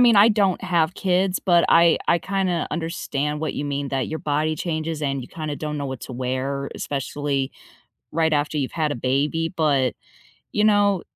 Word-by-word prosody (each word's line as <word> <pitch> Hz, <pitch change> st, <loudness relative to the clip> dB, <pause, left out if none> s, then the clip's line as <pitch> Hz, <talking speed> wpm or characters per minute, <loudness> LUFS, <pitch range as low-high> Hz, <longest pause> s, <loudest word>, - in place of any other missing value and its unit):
mean, 240 Hz, -3 st, +6 dB
I 205 Hz, +3 st, +8 dB
don't 200 Hz, -5 st, +2 dB
have 175 Hz, -2 st, +1 dB
kids, 185 Hz, 0 st, +1 dB
but 175 Hz, -3 st, +3 dB
I 170 Hz, 0 st, +6 dB
I 170 Hz, -, +4 dB
kinda 190 Hz, -4 st, -1 dB
understand 150 Hz, -3 st, -2 dB
what 160 Hz, -, -2 dB
you 145 Hz, -, -3 dB
mean 140 Hz, -1 st, -2 dB
that 135 Hz, -1 st, -1 dB
your 160 Hz, -, -3 dB
body 155 Hz, +1 st, 0 dB
changes 160 Hz, -1 st, -3 dB
and 140 Hz, -1 st, -1 dB
you 125 Hz, -, -10 dB
kinda 155 Hz, -3 st, -5 dB
don't 150 Hz, -1 st, -4 dB
know 140 Hz, -, -3 dB
what 130 Hz, -2 st, -5 dB
to 130 Hz, -, -7 dB
wear, 130 Hz, +2 st, -2 dB
especially 140 Hz, 0 st, -2 dB, 0.6 s
right 160 Hz, 0 st, +1 dB
after 150 Hz, +1 st, 0 dB
you've 135 Hz, -3 st, -2 dB
had 155 Hz, -3 st, 0 dB
a -, -, -3 dB
baby. 140 Hz, +6 st, 0 dB
But, 140 Hz, -6 st, +2 dB, 0.6 s
you 210 Hz, -, +2 dB
know, 205 Hz, -3 st, +3 dB
155 Hz, 190 wpm, -23 LUFS, 140-175 Hz, 0.6 s, I